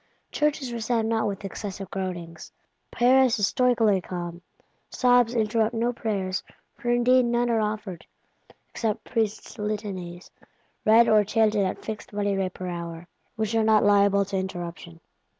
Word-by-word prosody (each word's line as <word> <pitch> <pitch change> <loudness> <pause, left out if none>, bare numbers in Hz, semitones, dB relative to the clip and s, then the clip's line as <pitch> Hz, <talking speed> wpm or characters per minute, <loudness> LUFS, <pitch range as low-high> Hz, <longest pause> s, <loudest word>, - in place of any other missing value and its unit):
Churches 295 -4 -1
resound 225 -1 -1
not 225 -1 +1
with 200 0 -5
excessive 195 -1 -6
groanings; 175 -4 -6 0.4
Paris 255 0 +4
is 205 - +2
stoically 225 -5 +2
calm: 175 -1 -6 0.5
sobs 245 -2 +3
interrupt 220 +1 +1
no 235 +2 0
prayers, 195 -5 -2 0.3
for 240 - -5
indeed 245 +1 +4
none 240 0 +1
are 225 - +2
offered; 210 -5 -4 0.6
except 220 -3 -3
Priests' 220 -4 -3
Litanies, 195 -4 -5 0.5
read 225 +2 +6
or 215 -2 +5
chanted 215 0 +2
at 185 - -6
fixed 215 -1 -7
money 205 -1 0
rate 190 -1 -2
per 185 - -6
hour, 170 -1 -6 0.3
which 220 -1 -2
are 225 -1 +2
not 220 -1 +4
liable 200 -1 +4
to 195 0 -3
interruption. 175 -3 -6
210 Hz, 145 wpm, -25 LUFS, 190-230 Hz, 0.6 s, read